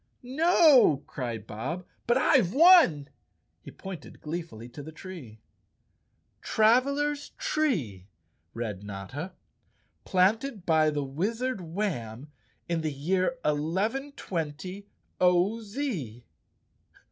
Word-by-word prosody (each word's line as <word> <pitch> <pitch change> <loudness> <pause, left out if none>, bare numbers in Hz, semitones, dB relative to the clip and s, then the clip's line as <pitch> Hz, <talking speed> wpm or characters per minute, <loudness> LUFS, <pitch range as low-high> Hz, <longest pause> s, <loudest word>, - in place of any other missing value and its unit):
"No," 275 - +5
cried 120 -5 -5
Bob, 135 - -5 0.2
"but 240 +1 +4
I've 255 - +3
won!" 315 - +6 0.5
He - - -11
pointed 190 -6 -9
glee¬ 165 +3 -4
fully 115 -7 -11
to 145 - -9
the 155 +3 -9
tree. 155 - -10 0.5
" - - -45
Travelers' 280 +6 +2
Tree," 220 - -1 0.5
read 105 -4 -4
Notta, 105 - -7 0.4
" - - -43 0.3
planted 205 +3 +1
by 160 -2 +4
the 145 -2 -2
Wiz¬ 200 - -2
ard 255 -7 -3
Warn 150 - -4 0.4
in 170 -1 -1
the 155 -1 -2
year 185 - 0
1120 185 - -2 0.3
0. 180 +5 +3
Z. 200 - -5
175 Hz, 110 wpm, -28 LUFS, 145-235 Hz, 0.5 s, won